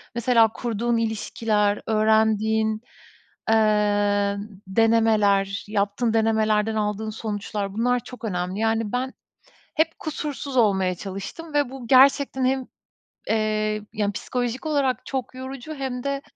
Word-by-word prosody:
mesela 235 -1 +4
kurduğun 235 0 -1
ilişkiler, 215 -2 0
öğrendiğin, 220 0 +2 0.7
eee, 205 -2 +2 0.3
denemeler, 210 -2 +2
yaptığın 205 +2 0
denemelerden 220 -1 +2
aldığın 210 0 -1
sonuçlar 205 -2 -4
bunlar 245 +3 +1
çok 245 +1 -12
önemli. 180 -1 -2
Yani, 225 -1 0
ben 255 +1 -2 0.6
hep 320 +1 +1
kusursuz 290 -3 -4
olmaya 190 -5 +3
çalıştım 200 - -7
ve 290 -3 +2
bu 260 -2 -9
gerçekten 265 0 +5
hem, 260 0 0 0.6
eee, 215 -1 0
yani, 205 -1 -1
ps - - -7
ikolojik 245 +2 -2
olarak 280 -4 0
çok 260 -2 -4
yorucu 260 +3 -7
hem 260 -3 -4
de 280 0 -2
220 Hz, 115 wpm, -24 LUFS, 210-250 Hz, 0.7 s, gerçekten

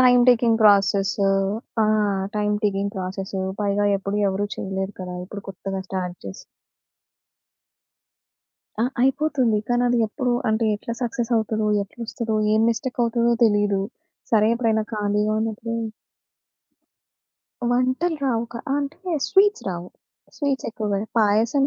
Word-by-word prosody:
Time 250 -1 +6
taking 235 -2 +4
process. 200 -1 +4 0.6
ఆ! - - +2 0.5
Time 210 0 +1
taking 200 0 0
process. 190 +1 -4 0.2
పైగా 205 0 +1
ఎప్పుడు 200 +1 -3
ఎవరు 200 +2 -1
చేయలేరు 190 +1 -4
కదా! 180 -1 -5
ఇప్పుడు 200 +1 -8
కొత్తగా 195 0 -5
స్టార్ట్ 180 -2 -3
చేసి 95 - -6 2.5
ఆ! - - +3 0.2
అయిపోతుంది. 265 -4 +2
కానీ, 245 0 +2
అది 245 0 +2
ఎప్పుడు 245 +3 -1 0.2
అంటే 220 +1 +1
ఎట్లా 230 +3 -5
సక్సెస్ 240 0 -2
అవుతదో, 220 0 0 0.2
ఎట్లొస్తదో, 225 +1 -4 0.2
ఏం 220 - +3
మిస్టేక్ 245 +2 -3
అవుతదో 235 0 +2
తెలీదు. 205 -2 +2 0.5
సరే, 215 0 +5
ఎప్పుడైనా 225 -2 +1
ఖాళీగా 210 0 0
ఉన్నప్పుడు 225 +1 -3 2.0
వంటలు 255 +7 +1
రావుక 235 -3 -1 0.2
ఆహ్, 275 - +2
అంటే 315 +6 -5 0.2
స్వీట్స్ 410 +1 +3
రావు. 175 -2 -4 0.5
స్వీట్స్ 280 -2 -1
ఎక్కువగా 210 -3 -2 0.2
పాయసం 225 +6 +3
220 Hz, 120 wpm, -23 LUFS, 200-245 Hz, 2.5 s, Time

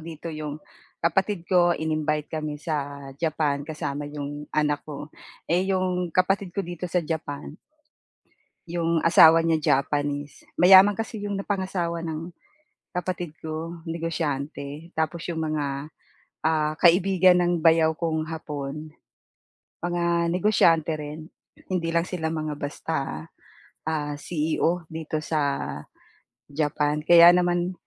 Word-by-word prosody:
dito 165 0 -7
'yong 150 -1 -5 0.4
kapatid 190 +1 0
ko 175 -2 +3
ininvite 155 -1 -1
kami 155 -1 -3
sa 145 -3 -4
Japan 155 -3 0
kasama 145 -1 -4
'yong 145 0 -6
anak 150 -1 0
ko. 145 0 -7 0.3
Eh, 180 +3 +1
'yong 185 -2 0
kapatid 185 +2 0
ko 200 - 0
dito 175 +1 -5
sa 175 -1 0
Japan 145 -2 -4 1.2
'yong 170 -1 0
asawa 165 0 +7
niya 160 -4 +2
Japanese, 145 0 -3 0.2
mayaman 190 +3 +8
kasi 225 +2 -5
'yong 205 0 -3
napangasawa 185 -4 -2
ng 160 +1 -4 0.6
kapatid 180 -2 -3
ko, 160 +2 -5
negosyante, 160 -2 -4
tapos 160 +1 -1
'yong 170 -2 -3
mga, 155 -2 -1 0.8
ah, 155 -1 +1
kaibigan 180 +1 +5
ng 175 0 +2
bayaw 160 0 +4
kong 160 -2 -1
Hapon 150 -1 -5 0.9
mga 170 -1 0
negosyante 170 -4 +3
rin. 150 +2 -8 0.4
Hindi 175 -3 -1
lang 170 - +3
sila 175 -3 -3
mga 155 -1 -3
basta, 150 +3 -3 0.9
ah, 150 -2 -2
CEO 165 +2 -1
dito 160 -1 -4
sa 155 0 -1 1.1
Japan. 150 0 0
Kaya 170 +2 +8
naman, 175 0 +1
160 Hz, 120 wpm, -25 LUFS, 150-175 Hz, 1.2 s, mayaman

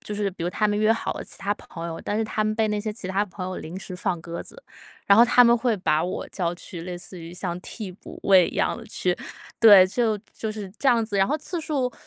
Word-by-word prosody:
就 210 - -6
是 205 -1 -1
比 170 -2 -6
如 - - 0
他 210 +3 +1
们 205 0 0
约 215 +1 +4
好 225 - -2
了 - - -6
其 - - -10
他 200 +1 0
朋 170 -4 -8
友， 165 - -6
但 205 - -1
是 225 - +1
他 215 -1 -1
们 215 - 0
被 220 0 +1
那 210 0 0
些 215 0 -3
其 205 -4 -7
他 195 +2 +1
朋 180 -1 -7
友 185 0 -4
临 165 +3 -7
时 185 -1 -7
放 175 -1 -2
鸽 170 0 -6
子， - - -11 0.4
然 200 +1 +6
后 235 - +9
他 245 +1 +6
们 235 0 +6
会 230 -1 +1
把 160 -4 +1
我 185 - -4
叫 175 -2 -2
去 175 -1 -8
类 180 0 -5
似 180 +1 -10
于 165 +2 -9
像 175 -1 -4
替 210 +1 -7
补 180 - -12
位 190 -3 +6
一 - - -9
样 - - +1
地 - - -10
去 - - -1 0.4
对， 205 -5 +9
就 220 +2 0 0.2
就 220 - -4
是 205 -3 -7
这 275 - +2
样 235 -2 +4
子， 210 -2 -3
然 195 - +4
后 300 - 0
次 325 +3 -5
数 275 -5 -1
205 Hz, 300 characters per minute, -24 LUFS, 180-225 Hz, 0.4 s, 后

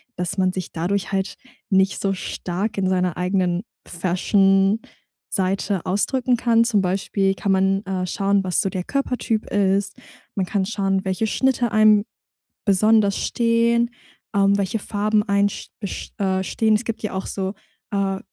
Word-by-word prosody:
dass 180 +2 -3
man 185 -1 +3
sich 185 -1 -5
dadurch 180 +4 -2
halt 195 0 -1 0.3
nicht 190 0 +2
so 195 -1 +1
stark 190 +2 -4
in 190 -1 +1
seiner 180 -1 +1
eigenen 180 -1 0 0.3
Fashion-Seite 195 +1 0
ausdrücken 250 +6 +1
kann. 230 -1 +3
Zum 225 -4 +2
Beispiel 195 +1 0
kann 195 - -1
man, 195 +1 +2
äh, 190 -1 -2
schauen, 200 +1 +1
was 185 -2 0
so 195 - -1
der 185 -2 -3
Körpertyp 250 -3 -1
ist. 195 0 +1 0.4
Man 195 - 0
kann 195 -1 0
schauen, 195 -2 -1
welche 190 +4 0
Schnitte 245 -1 +1
einem 215 -1 +5 0.6
besonders 205 0 +3
stehen, 235 0 +2 0.5
ähm, 200 0 +4
welche 200 +3 -1
Farben 210 +1 0
einen 200 -1 +2
st - - -9
best 200 -3 -7
äh, 190 -1 +1
stehen. 220 +3 +2
Es 220 +3 -2
gibt 230 - -4
ja 215 - -4
auch 190 0 -3
so, 190 0 -3 0.4
äh, 195 -1 0
195 Hz, 155 wpm, -22 LUFS, 190-215 Hz, 0.6 s, einem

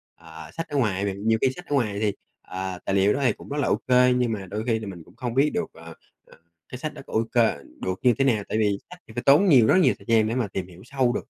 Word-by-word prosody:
à, 80 -1 -12
sách 165 0 -5
ở 145 - -2
ngoài 100 -6 0
bạn. 100 +2 -4
Nhiều 110 0 +4
khi 130 - +4
sách 180 - -10
ở 145 - -1
ngoài 105 -7 0
thì, 105 -1 0 0.3
ờ, 95 -1 -5
tài 95 - 0
liệu 100 +1 +4
đó - - -2
thì 125 - +4
cũng - - -14
rất 145 - -3
là 145 - 0
ô - - +3
kê 125 0 +5
nhưng 125 -2 +1
mà 100 -3 -4
đôi 105 +4 -4
khi 115 -2 +1
là 110 - -7
mình 90 -4 -8
cũng 90 - -20
không 120 0 -4
biết 140 +4 +3
được, 220 -1 -1
ờ, 85 0 -12 0.3
ờ, - - -19 0.3
cái 125 - -7
sách 150 +4 -5
đó - - -10
có - - -11
ô 110 - +2
kê, 120 -2 +3 0.2
được 95 0 -3
như 125 -2 +5
thế 135 - +2
nào? 110 -6 +2
Tại - - -1
vì 105 -2 +1
sách 180 0 -12
thì 110 - -13
phải 120 +2 -4
tốn 145 +10 +5
nhiều, 125 -8 +6
rất - - +5
nhiều 185 - +4
thời - - -18
gian 110 -2 +3
để 115 - -2
mà 125 -4 0
tìm 95 -2 -5
hiểu 90 0 -15
sâu 130 -2 0
được. - - -4
115 Hz, 315 wpm, -24 LUFS, 100-130 Hz, 0.3 s, nhiều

